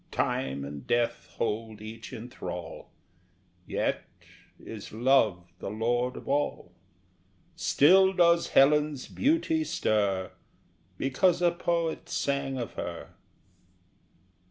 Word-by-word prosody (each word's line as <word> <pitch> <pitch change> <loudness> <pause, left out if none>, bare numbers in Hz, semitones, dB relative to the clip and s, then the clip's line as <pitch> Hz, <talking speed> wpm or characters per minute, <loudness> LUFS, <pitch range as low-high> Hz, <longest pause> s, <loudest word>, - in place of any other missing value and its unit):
Time 70 +1 -1
and 70 -2 -8
Death 120 0 0
hold 110 -1 -2
each 110 +2 -9
in 120 -2 -7
thrall, 125 - -7 0.8
Yet - - -1 0.6
is 110 -3 -9
Love 110 -8 +2
the - - -5
lord 120 +4 -1
of - - -10
all; 140 -10 -1 0.8
Still 190 +6 +5
does 170 -2 +4
Helen's 150 0 +3
beauty 320 +3 +1
stir 100 - 0 0.7
Because 165 +7 +2
a 175 -1 +3
poet 170 -1 -2
sang 140 -1 -1
of 120 - -4
her! - - -6
125 Hz, 105 wpm, -28 LUFS, 110-165 Hz, 0.8 s, Still